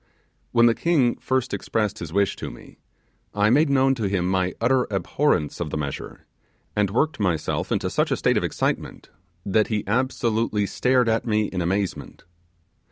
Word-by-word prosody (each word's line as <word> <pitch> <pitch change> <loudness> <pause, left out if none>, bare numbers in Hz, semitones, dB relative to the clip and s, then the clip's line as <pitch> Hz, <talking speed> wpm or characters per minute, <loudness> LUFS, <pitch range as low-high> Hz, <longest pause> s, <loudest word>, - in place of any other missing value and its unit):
When 120 0 +5
the 115 - +5
king 140 -5 +1
first 130 -1 -1
expressed 105 -2 -2
his 80 -2 -6
wish 100 +1 +1
to - - -5
me, - - -14 0.6
I 105 +1 +3
made 145 +4 +4
known 135 -1 +3
to 115 -5 -3
him 90 -2 0
my 90 -1 0
utter 125 +2 +2
abhorrence 100 - 0
of 85 -3 -3
the - - -3
measure, 70 -2 -6 0.5
and 105 -2 +2
worked 145 +7 0
myself 90 -7 -1
into - - 0
such - - 0
a - - 0
state - - +2
of - - +1
excitement, - - -3 0.3
that 105 +2 +2
he 110 -3 -1
absolutely 115 -2 0
stared 125 +4 +1
at 115 +1 0
me 110 -1 +2
in 90 - -3
amazement. 95 +2 -3
110 Hz, 170 wpm, -24 LUFS, 95-125 Hz, 0.6 s, When